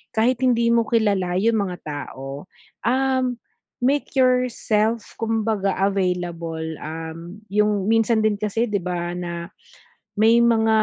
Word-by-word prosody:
kahit 235 +3 +2
hindi 235 -2 +3
mo 230 -1 +3
kilala 200 -6 +1
'yung 225 +2 +2
mga 185 -3 -2
tao, 140 -1 -6 0.4
um, 260 +1 +2 0.6
make 280 +3 +1
yourself 235 -3 +2 0.2
kumbaga 220 -3 0
available, 180 -4 -1 0.2
um, 165 +4 -7 0.2
'yung 210 -2 +2
minsan 225 0 +3
din 215 -1 +2
kasi 215 +3 0
'di 200 -3 -1
ba 175 -1 -3
na 170 0 -5 0.7
may 225 +2 +5
mga 225 -1 +3
210 Hz, 120 wpm, -22 LUFS, 180-230 Hz, 0.7 s, may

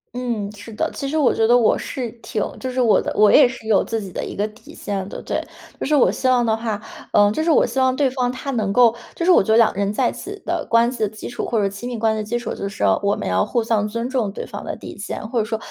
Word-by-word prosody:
嗯， 235 -5 -3
是 210 +2 -11
的， - - -1
其 275 - -4
实 310 - -1
我 290 -5 +3
觉 225 0 +2
得 245 +1 +6
我 230 - +3
是 245 -5 -5
挺 215 - -2 0.2
就 260 - -4
是 255 0 -1
我 230 -4 +4
的 - - -3
我 210 0 +5
也 280 -4 +7
是 245 -3 -9
有 215 -3 +4
自 225 -1 -3
己 195 -3 -8
的 - - -4
一 - - -7
个 205 - 0
底 220 +2 -16
线 195 -2 -4
的。 - - -7
对， - - -2 0.4
就 - - -3
是 300 +2 +2
我 270 - +4
希 260 - -2
望 250 -2 +3
的 220 - +2
话， 220 -2 -3 0.3
嗯， 205 0 +5
就 215 - -1
是 330 - 0
我 310 - +5
希 265 - -2
望 260 0 +3
对 275 -2 +2
方 250 -1 -1
他 255 +2 -4
能 215 -6 -1
够， 240 -2 +5 0.2
就 335 - -3
是 370 - +5
我 - - +6
觉 220 +3 +1
得 225 - +5
两 230 - +5
个 - - -7
人 200 0 0
在 245 +2 +2
一 - - -4
起 405 +1 -8
的 345 0 -2
关 230 +1 +4
系 245 - -8
的 215 - +2
基 215 +1 -8
础， 245 - -4
或 230 - -1
者 - - +1
说 195 - +1
亲 200 +5 -7
密 245 -2 -4
关 220 0 +2
系 - - -3
的 215 - -2
基 240 +3 -1
础。 240 - -4
就 200 - -4
是 195 - -5 0.2
我 200 0 +1
们 - - -5
要 95 +1 +2
互 235 - 0
相 220 -2 +1
尊 230 +3 -3
重 250 -6 0
对 - - -5
方 - - -8
的 - - -4
底 - - -10
线， - - -6
或 245 - 0
者 215 - 0
说 220 0 -2
230 Hz, 345 characters per minute, -21 LUFS, 210-255 Hz, 0.4 s, 也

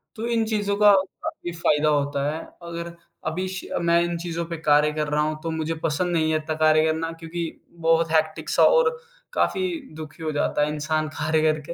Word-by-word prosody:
तो 225 - -4
इन 230 -1 +1
चीज़ों 205 -2 0
का 210 0 +7 0.3
काफ़ी 175 - -5
फायदा 155 -2 +2
होता 145 -1 +1
है, 155 - -4 0.2
अगर 170 0 -6 0.3
अभी 175 +4 -2
श 190 - -6 0.2
मैं 170 0 +3
इन 175 0 -2
चीज़ों 170 0 -3
पे 170 0 -5
कार्य 150 -1 +3
कर 150 0 -1
रहा 150 0 +1
हूँ 155 0 -1
तो 165 - -2
मुझे 160 0 -2
पसंद 170 +3 0
नहीं 160 -2 +2
है 155 - +2
इत्ता 155 0 -3
कार्य 155 0 +4
करना, 160 +1 -1
क्योंकि 165 0 -6 0.2
बहुत 165 0 +3
हेक्टिक 155 -1 0
सा - - +4
और 485 -2 +5 0.4
काफ़ी 375 -6 +1 0.3
दुखी 155 0 -9
हो 155 - -1
जाता 145 0 0
है 150 - -3
इंसान 155 +1 -1
कार्य 155 +1 +1
करके। 155 +1 -5
160 Hz, 205 wpm, -24 LUFS, 155-170 Hz, 0.4 s, का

